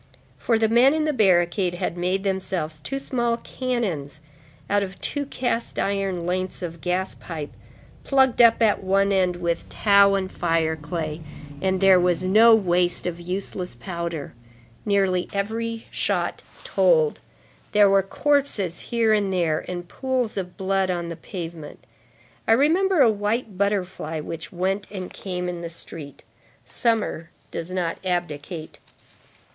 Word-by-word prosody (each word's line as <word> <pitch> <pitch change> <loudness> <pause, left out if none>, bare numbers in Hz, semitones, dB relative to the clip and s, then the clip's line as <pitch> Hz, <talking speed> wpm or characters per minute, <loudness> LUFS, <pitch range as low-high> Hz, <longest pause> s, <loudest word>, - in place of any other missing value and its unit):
For 230 - +1
the 220 0 +3
men 245 +6 +5
in 310 -1 +1
the 305 - +1
barricade 180 -4 +2
had 175 - -2
made 180 +2 -1
themselves 185 -5 -2
two 275 - -3
small 240 -3 -1
cannons 205 - -3 0.5
out 205 0 +2
of 195 -1 -5
two 285 -1 -2
cast 245 -3 -2
iron 195 -3 -1
lengths 185 +1 -2
of 170 -2 -6
gas 185 +1 -1
pipe, 155 -4 -7 0.5
plugged 265 -3 +3
up 230 0 +6
at 210 -3 +2
one 195 +1 +2
end 185 -2 +2
with 170 -1 -2
tow 200 -1 +5
and 190 -1 -2
fire 165 -2 0
clay. 155 0 -4 0.4
There 190 0 +4
was 180 0 +1
no 220 +4 +7
waste 180 -4 +1
of 175 -1 -3
useless 180 -3 -4
powder. 170 +2 -5 0.5
Nearly 195 -3 +1
every 225 +3 -3
shot - - -1 0.2
told. 480 -2 +3 0.5
There 205 -1 +6
were 195 0 +4
corpses 220 - 0
here 230 -2 +1
and 205 -2 +1
there, 170 -4 0
and 175 -1 -5
pools 255 +1 -2
of 180 -3 -5
blood 195 -1 0
on 175 -2 -2
the 170 - -5
pavement. 165 -4 -8 0.6
I 225 - +6
remember 330 +7 +3
a 235 -4 +6
white 210 +1 -2
butterfly 185 -5 -1
which 160 +1 -7
went 190 +3 -1
and 190 -3 -7
came 180 -2 -4
in 175 -1 -4
the 170 - -5
street. 155 -4 -9 0.4
Summer 220 - -1 0.2
does 165 - -5
not 180 -3 -2
abdicate. 170 -3 -4
190 Hz, 145 wpm, -24 LUFS, 175-220 Hz, 0.6 s, no